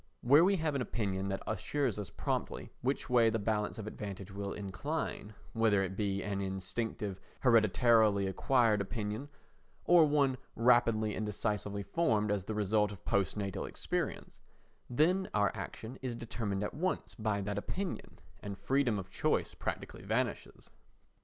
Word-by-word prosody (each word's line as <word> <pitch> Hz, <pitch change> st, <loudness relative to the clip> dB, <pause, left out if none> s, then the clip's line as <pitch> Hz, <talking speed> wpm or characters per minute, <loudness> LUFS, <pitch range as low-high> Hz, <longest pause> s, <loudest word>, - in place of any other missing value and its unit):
Where 145 Hz, +7 st, +6 dB
we 195 Hz, +2 st, +4 dB
have 160 Hz, -4 st, 0 dB
an 140 Hz, -, 0 dB
opinion 100 Hz, -5 st, -2 dB
that 95 Hz, -, -3 dB
assures 115 Hz, +2 st, -1 dB
us 100 Hz, -4 st, -5 dB
promptly -, -, -3 dB
which 135 Hz, +3 st, -1 dB
way 120 Hz, -3 st, +5 dB
the 115 Hz, -, 0 dB
balance 105 Hz, 0 st, -1 dB
of 110 Hz, -, -5 dB
advantage 100 Hz, -2 st, -6 dB
will 100 Hz, 0 st, -4 dB
incline—whether 110 Hz, -2 st, -1 dB
it 95 Hz, 0 st, -4 dB
be 100 Hz, -1 st, -1 dB
an 100 Hz, -1 st, -2 dB
instinctive, 95 Hz, +1 st, -3 dB, 0.2 s
hereditarily 110 Hz, -3 st, +4 dB
acquired 110 Hz, +2 st, +3 dB
opinion 105 Hz, +5 st, -4 dB, 0.6 s
or 170 Hz, -3 st, +7 dB
one 140 Hz, -3 st, +2 dB, 0.2 s
rapidly 115 Hz, -2 st, +4 dB
and 110 Hz, -, -3 dB
decisively 105 Hz, -1 st, -2 dB
formed 110 Hz, -, +1 dB
as 100 Hz, -3 st, -1 dB
the 110 Hz, -, -3 dB
result 105 Hz, 0 st, +2 dB
of 100 Hz, -4 st, -11 dB
post 100 Hz, -2 st, +1 dB
natal 100 Hz, -3 st, -3 dB
experience—then 175 Hz, +9 st, -2 dB
our 105 Hz, -1 st, +3 dB
action 115 Hz, +4 st, -7 dB
is 125 Hz, -2 st, -3 dB
determined 110 Hz, -4 st, -3 dB
at 105 Hz, -, -3 dB
once 185 Hz, +6 st, -2 dB
by 110 Hz, -3 st, -1 dB
that 100 Hz, +1 st, -2 dB
opinion, 185 Hz, -, -5 dB, 0.2 s
and 100 Hz, -1 st, -6 dB
freedom 125 Hz, +2 st, +1 dB
of 95 Hz, 0 st, -6 dB
choice -, -, 0 dB
practically -, -, -5 dB
vanishes. -, -, -2 dB
110 Hz, 145 wpm, -33 LUFS, 100-125 Hz, 0.6 s, or